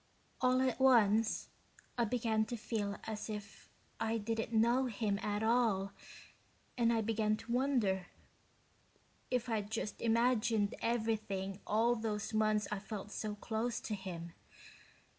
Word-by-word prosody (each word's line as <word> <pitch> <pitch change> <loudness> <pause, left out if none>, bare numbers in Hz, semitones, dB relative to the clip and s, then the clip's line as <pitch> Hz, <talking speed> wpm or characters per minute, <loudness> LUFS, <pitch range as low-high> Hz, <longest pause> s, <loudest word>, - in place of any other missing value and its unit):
All 255 0 +4
at 260 -1 0
once 225 -4 +4 0.5
I 235 - +2
began 220 -1 +1
to 240 +1 -4
feel 210 -2 -2
as 215 0 -5
if 210 -1 -7 0.3
I 225 0 0
didn't 225 +1 -2
know 235 +4 +3
him 210 -3 -1
at 210 +1 -1
all 220 -4 +2 0.8
and 235 -2 +3
I 225 -1 +2
began 215 -1 +1
to 230 +2 -8
wonder 235 -8 +1 1.2
if 250 -1 0
I'd 215 -3 -1
just 220 -1 -3
imagined 230 -2 +2
everything 215 -4 -1
all 230 +3 +3
those 220 -2 -3
months 215 -1 +2
I 210 - -1
felt 210 0 -7
so 215 -1 -3
close 225 +3 -2
to 215 - -4
him. 175 -4 -6
220 Hz, 135 wpm, -35 LUFS, 210-235 Hz, 1.2 s, All